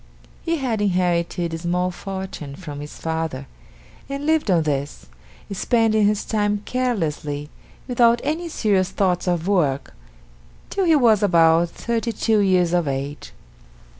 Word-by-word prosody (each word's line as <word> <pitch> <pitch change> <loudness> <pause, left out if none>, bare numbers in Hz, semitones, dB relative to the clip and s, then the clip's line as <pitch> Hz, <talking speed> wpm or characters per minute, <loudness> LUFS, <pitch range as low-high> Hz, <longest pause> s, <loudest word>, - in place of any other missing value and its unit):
He 335 0 -1
had 240 -7 -1
inherited 175 -3 0
a 165 - -3
small 180 +2 0
fortune 190 -6 -6
from 150 -5 -8
his 150 0 -8
father 160 -4 -3 0.6
and 275 +1 -4
lived 315 -6 +2
on 170 -3 +3
this, 145 -1 -3 0.5
spending 220 +1 +2
his 210 -1 0
time 205 -1 0
carelessly, 155 - -2 0.4
without 240 -1 +4
any 320 +4 -2
serious 200 - +1
thoughts 185 -2 0
of 175 -1 0
work, 150 -9 +1 0.8
till 390 -1 0
he 325 -2 +5
was 230 -7 +4
about 170 -3 +4
thirty 230 +4 -2
two 220 -1 +1
years 185 -3 +3
of 175 -3 +1
age. 140 +2 -4
185 Hz, 135 wpm, -22 LUFS, 165-225 Hz, 0.8 s, he